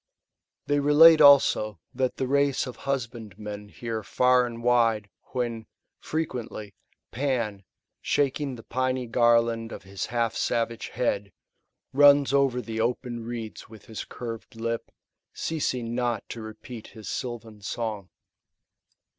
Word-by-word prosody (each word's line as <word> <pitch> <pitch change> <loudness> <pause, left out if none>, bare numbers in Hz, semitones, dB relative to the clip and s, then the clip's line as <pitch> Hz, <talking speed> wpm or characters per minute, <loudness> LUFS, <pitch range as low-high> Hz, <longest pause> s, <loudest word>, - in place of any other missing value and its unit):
They 145 0 +2
relate, 155 +3 +7
also, 135 - +6
that 130 0 -1
the 130 - 0
race 140 0 +2
of 125 - -7
husbandmen 110 -6 -5
hear 115 +1 -4
far 125 +3 +3
and 115 0 -8
wide, 115 -4 +2 0.2
when, 115 -3 -2 0.3
frequently. 120 -9 -4 0.4
Pan, 115 -7 -2 0.4
shaking 140 -1 0
the 115 - -11
piny 130 0 -1
garland 115 -1 +2
of - - -8
his 95 +1 -5
half 115 -1 0
savage 115 0 -1
head, 105 -5 -1 0.6
runs 140 0 +6
over 135 -3 +3
the 110 -1 -3
open 120 0 -2
reeds 115 -2 -6
with 110 -2 -14
his 110 - -6
curved 115 -1 -8
lip, 115 0 -3 0.4
ceasing 125 -7 -2
not 120 -1 -1
to 115 - -6
repeat^ 110 +1 -9
his 110 - -9
sylvan 115 -4 -5
song. 105 -2 -4
120 Hz, 125 wpm, -26 LUFS, 110-130 Hz, 0.6 s, relate